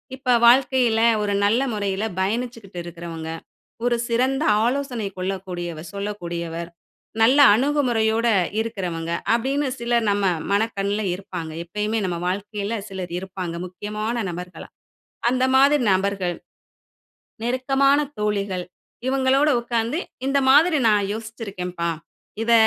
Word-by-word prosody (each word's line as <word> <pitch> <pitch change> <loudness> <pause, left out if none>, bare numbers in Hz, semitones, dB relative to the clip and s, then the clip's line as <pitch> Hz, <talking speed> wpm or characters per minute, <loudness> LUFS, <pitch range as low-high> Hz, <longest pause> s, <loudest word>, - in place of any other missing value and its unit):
இப்ப 260 -1 -1
வாழ்க்கைல 245 -2 +4 0.2
ஒரு 205 -1 0
நல்ல 225 +5 +3
முறையில 200 -1 -2 0.2
பயணிச்சிட்டு 215 -1 -3
இருக்கிறவங்க. 165 -1 -7 0.5
ஒரு 245 0 +2
சிறந்த 260 +5 +1 0.2
ஆலோசனை 250 -4 -1
கொள்ளக்கூடியவ 180 -3 -4
சொல்லக்கூடியவர். 170 -4 -4 0.5
நல்லா 265 +6 +6
அணுகுமுறையோட 240 -4 +1 0.3
இருக்றவங்க. 180 -7 -3 0.2
அப்டின்னு 270 +5 0
சிலர் 235 -1 +1
நம்ம 200 0 0 0.3
மனக்கண்ல 205 0 0
இருப்பாங்க. 180 -4 -7
எப்பயுமே 210 +5 -2
நம்ம 175 -2 -2
வாழ்க்கைல 205 +3 -3
சிலர் 185 -3 -6
இருப்பாங்க 185 -2 -5
முக்கியமான 210 +5 -4
நபர்களா. 180 +1 -8 0.6
அந்த 255 0 +1
மாதிரி 280 +1 +5
நபர்கள், 190 -2 0 1.1
நெருக்கமான 270 +3 +2 0.2
தோழிகள், 200 -3 -1 0.4
இவங்களோட 270 +2 +3
உட்கார்ந்து 235 +5 -1 0.3
இந்த 280 +1 +3
மாதிரி 310 +3 +6
நான் 205 -2 +2
யோசிச்சிருக்கேன்ப்பா, 200 -6 -4 0.5
இத 235 - +3
210 Hz, 105 wpm, -23 LUFS, 185-245 Hz, 1.1 s, நல்லா